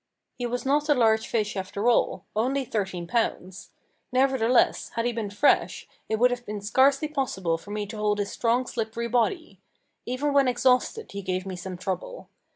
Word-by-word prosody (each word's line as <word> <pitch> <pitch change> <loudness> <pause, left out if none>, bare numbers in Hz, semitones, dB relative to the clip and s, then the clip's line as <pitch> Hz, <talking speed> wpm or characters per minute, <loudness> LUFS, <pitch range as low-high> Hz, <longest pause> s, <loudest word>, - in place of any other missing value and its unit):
He 245 - -4
was 245 +1 -3
not 290 +3 +1
a 295 - +5
large 220 -3 +3
fish 215 -3 -1
after 200 +3 -3
all 230 -5 +2
only 260 +5 0
thirteen 190 -6 -3
pounds. 190 -2 -2 0.4
Nevertheless, 255 -2 +2
had 230 - 0
he 240 - 0
been 220 -3 -3
fresh, 205 +8 +2 0.2
it 220 - +1
would 245 +2 +4
have 245 0 -3
been 210 -2 -5
scarcely 270 +8 +3
possible 240 - -1
for 200 - -14
me 210 0 -3
to 215 +2 -8
hold 210 -1 +1
his 205 -1 -2
strong 240 +2 +1
slippery 230 -1 -3
body. 245 - -1 0.5
Even 275 +4 -1
when 280 -2 +4
exhausted 255 - +1
he 200 - -5
gave 185 0 -3
me 190 -1 -5
some 180 0 -7
trouble. 185 - -5
230 Hz, 180 wpm, -26 LUFS, 200-255 Hz, 0.5 s, a